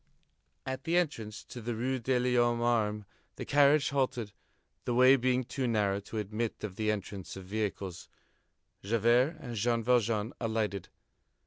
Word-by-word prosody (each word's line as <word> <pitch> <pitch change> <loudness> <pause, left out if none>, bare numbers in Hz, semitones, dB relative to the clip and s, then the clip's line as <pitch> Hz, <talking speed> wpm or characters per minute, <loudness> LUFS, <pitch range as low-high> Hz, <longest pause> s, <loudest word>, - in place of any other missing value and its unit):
At 130 0 -4
the 170 +2 +1
entrance 115 -11 -2
to 120 - -9
the 120 +1 -3
Rue 130 +3 -1
de 125 +2 +1
l'Homme 120 -1 +2
Armé, 110 -3 0 0.3
the - - -6
carriage 145 +1 +4
halted, 125 -6 -1 0.5
the 120 - -1
way 130 +2 +7
being 130 0 +1
too 125 +1 -3
narrow 105 -4 +1
to 100 +2 -8
admit 105 +2 -3
of 100 -3 -5
the 110 +1 -1
entrance 100 -2 -4
of 95 -1 -9
vehicles. 100 -3 -4 0.7
Javert 120 - +2
and 120 -3 -7
Jean 115 +2 +1
Valjean 115 -2 +1
alighted. 110 -4 -2
115 Hz, 150 wpm, -31 LUFS, 105-125 Hz, 0.7 s, way